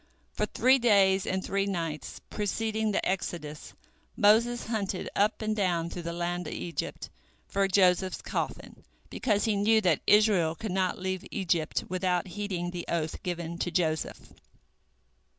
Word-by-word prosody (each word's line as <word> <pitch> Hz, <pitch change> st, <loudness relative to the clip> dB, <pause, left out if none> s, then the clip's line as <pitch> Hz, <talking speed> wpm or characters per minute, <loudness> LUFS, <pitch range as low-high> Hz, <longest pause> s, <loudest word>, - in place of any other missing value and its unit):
For -, -, -1 dB
three 260 Hz, +1 st, +4 dB
days 195 Hz, -5 st, +4 dB
and 190 Hz, 0 st, -1 dB
three 195 Hz, 0 st, 0 dB
nights 165 Hz, -6 st, -4 dB
preceding 220 Hz, +1 st, -1 dB
the -, -, 0 dB
exodus 165 Hz, -5 st, -4 dB, 0.4 s
Moses 230 Hz, +4 st, +4 dB
hunted 205 Hz, -4 st, -2 dB
up 210 Hz, +2 st, +1 dB
and 215 Hz, 0 st, 0 dB
down 175 Hz, -5 st, 0 dB
through 175 Hz, -, -5 dB
the 170 Hz, 0 st, -4 dB
land 175 Hz, 0 st, -3 dB
of -, -, -5 dB
Egypt 170 Hz, -, -4 dB, 0.4 s
for 195 Hz, 0 st, +1 dB
Joseph's 185 Hz, -1 st, +2 dB
coffin, -, -, -4 dB, 0.3 s
because 210 Hz, -5 st, +1 dB
he 220 Hz, -2 st, +1 dB
knew 215 Hz, +2 st, +4 dB
that 175 Hz, -7 st, +2 dB
Israel 205 Hz, -7 st, +4 dB
could 210 Hz, +4 st, -5 dB
not 185 Hz, 0 st, 0 dB
leave 185 Hz, 0 st, -3 dB
Egypt 170 Hz, -5 st, 0 dB
without 180 Hz, 0 st, -1 dB
heeding 180 Hz, -2 st, -3 dB
the 175 Hz, -1 st, -5 dB
oath 160 Hz, -2 st, -2 dB
given 170 Hz, -1 st, -4 dB
to -, -, -1 dB
Joseph. 160 Hz, -2 st, -2 dB
185 Hz, 150 wpm, -29 LUFS, 175-205 Hz, 0.4 s, three